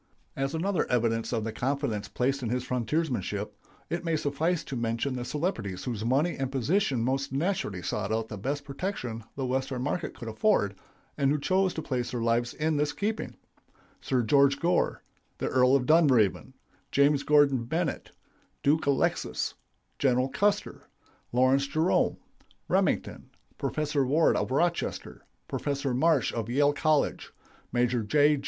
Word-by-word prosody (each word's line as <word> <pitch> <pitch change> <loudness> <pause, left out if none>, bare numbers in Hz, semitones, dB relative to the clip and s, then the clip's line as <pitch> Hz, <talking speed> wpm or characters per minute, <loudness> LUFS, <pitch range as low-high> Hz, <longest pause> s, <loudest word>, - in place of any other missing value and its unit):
As 135 +3 -2
another 185 +3 0
evidence 115 -2 +1
of 115 -3 -1
the 110 - -3
confidence 120 -4 -2
placed 130 +6 -1
in 120 - -2
his 125 +1 -1
frontiersmanship, 125 - -1 0.4
it 170 +2 -3
may 165 -1 0
suffice 155 +4 0
to 135 - -6
mention 115 +3 -1
the 125 - -3
celebrities 120 - -3
whose 115 -4 -3
money 140 +9 +1
and 135 -1 -2
position 135 - +1
most 135 +2 -1
naturally 135 - -1
sought 110 +4 -2
the 110 - -6
best 140 +8 -3
protection 135 - -4
the 135 - -2
Western 130 0 -2
market 145 +5 -2
could 115 - -8
afford, 110 - +2 0.5
and 140 - +3
who 150 +1 +1
chose 185 +5 +2
to 160 - -4
place 125 -3 -2
their 125 - -3
lives 115 +1 0
in 155 -1 0
his 150 0 0
keeping: 210 +7 -3 0.7
Sir 125 -2 0
George 140 +4 +4
Gore, 175 +1 +1 0.3
the - - -2
Earl 130 +1 +4
of 130 -2 +1
Dunraven, 130 - +3 0.4
James 140 0 +4
Gordon 145 -4 +3
Bennett, 160 +5 -2 0.5
Duke 150 +2 +2
Alexis, 140 -1 0 0.5
General 130 -1 +2
Custer, 205 +7 -1 0.4
Lawrence 130 +3 +3
Jerome, 160 +5 +1 0.5
Remington, - - 0 0.3
Professor 150 -2 0
Ward 150 +5 +3
of - - -1
Rochester, 170 +6 -1 0.2
Professor 140 -2 -2
Marsh 155 +1 +2
of 115 -1 -3
Yale 145 +3 +3
College, 155 0 0 0.4
Maj. 120 -2 +1
J. 150 +2 +4
135 Hz, 145 wpm, -28 LUFS, 120-150 Hz, 0.7 s, George